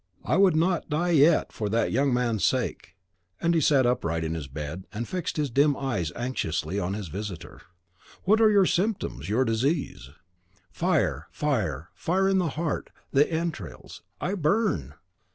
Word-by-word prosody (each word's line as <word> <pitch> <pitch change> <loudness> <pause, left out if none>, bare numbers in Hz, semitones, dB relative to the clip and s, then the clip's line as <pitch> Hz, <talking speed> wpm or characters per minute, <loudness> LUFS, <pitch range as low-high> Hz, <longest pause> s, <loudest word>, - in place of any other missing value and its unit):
I - - +1
would 190 -2 +5
not 170 +1 +1
die 170 +4 0
yet, 155 +1 +4
for 105 -2 -3
that 115 +2 +1
young 135 +3 +2
man's 120 -5 0
sake." - - -1 0.4
And 170 0 +2
he 165 - +2
sat 140 -3 +4
upright 85 -10 0
in 80 0 -2
his 80 -4 -5
bed, 75 +6 -6
and 115 +3 -4
fixed 180 -4 -3
his 145 -4 -1
dim 140 +3 +3
eyes 100 - -2
anxiously 100 -7 -2
on 95 +1 -2
his 105 -3 -5
visitor. 95 - -7 0.6
"What 215 +4 +4
are 220 - +7
your 200 -2 +5
symptoms, 190 - -1
your 125 +5 +2
disease?" 125 - -1 0.6
"Fire, 75 -4 0
fire, 95 - -2
fire 190 +3 0
in 195 0 +3
the 175 -3 +1
heart, 160 -2 -2 0.2
the 145 +4 +3
entrails: 160 - -5 0.2
I 185 - -2
burn!" 150 - 0
130 Hz, 165 wpm, -26 LUFS, -, 0.6 s, are